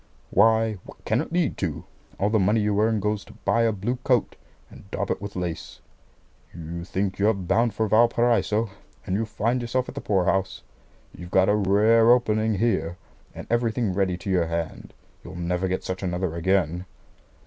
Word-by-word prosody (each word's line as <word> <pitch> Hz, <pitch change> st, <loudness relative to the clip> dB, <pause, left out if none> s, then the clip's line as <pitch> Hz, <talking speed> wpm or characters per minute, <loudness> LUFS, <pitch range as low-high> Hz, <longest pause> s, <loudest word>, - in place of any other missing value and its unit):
"Why, 110 Hz, 0 st, +3 dB
what -, -, -15 dB
can -, -, +1 dB
it -, -, -7 dB
lead 170 Hz, -3 st, 0 dB
to? 80 Hz, -6 st, -3 dB, 0.3 s
All 100 Hz, +2 st, +1 dB
the 110 Hz, -, +3 dB
money 105 Hz, +4 st, +3 dB
you 105 Hz, -1 st, +1 dB
earn 110 Hz, 0 st, +2 dB
goes 105 Hz, 0 st, -1 dB
to -, -, -14 dB
buy 115 Hz, -, +3 dB
a 115 Hz, -1 st, +3 dB
blue 110 Hz, +5 st, -2 dB
coat, 125 Hz, -2 st, 0 dB, 0.4 s
and 100 Hz, -, -15 dB
daub 100 Hz, -1 st, -2 dB
it -, -, -2 dB
with 100 Hz, 0 st, -7 dB
lace. 90 Hz, -3 st, -5 dB, 0.8 s
You 85 Hz, 0 st, -6 dB
think 95 Hz, +1 st, -2 dB
you're 105 Hz, +2 st, +3 dB
bound 110 Hz, +5 st, 0 dB
for 110 Hz, -, 0 dB
Valparaiso, 115 Hz, -1 st, +2 dB, 0.3 s
and 95 Hz, -, -1 dB
you 110 Hz, +2 st, -1 dB
find 115 Hz, +3 st, -1 dB
yourself 125 Hz, +2 st, -1 dB
at -, -, -7 dB
the 140 Hz, -, -6 dB
poor 95 Hz, -3 st, +1 dB
house. 95 Hz, 0 st, -1 dB, 0.5 s
You've 85 Hz, 0 st, -9 dB
got 95 Hz, +1 st, +3 dB
a 105 Hz, -, +4 dB
rare 105 Hz, +3 st, +4 dB
opening 110 Hz, -3 st, +3 dB
here, 90 Hz, -6 st, 0 dB, 0.4 s
and -, -, -8 dB
everything 115 Hz, -3 st, 0 dB
ready 95 Hz, -2 st, 0 dB
to 95 Hz, +3 st, -7 dB
your 90 Hz, -3 st, +2 dB
hand. 85 Hz, -1 st, -5 dB, 0.3 s
You'll -, -, -10 dB
never 90 Hz, +1 st, -1 dB
get 95 Hz, 0 st, -2 dB
such 95 Hz, 0 st, -4 dB
another 90 Hz, -2 st, -2 dB
again." 90 Hz, 0 st, 0 dB
100 Hz, 185 wpm, -25 LUFS, 95-115 Hz, 0.8 s, a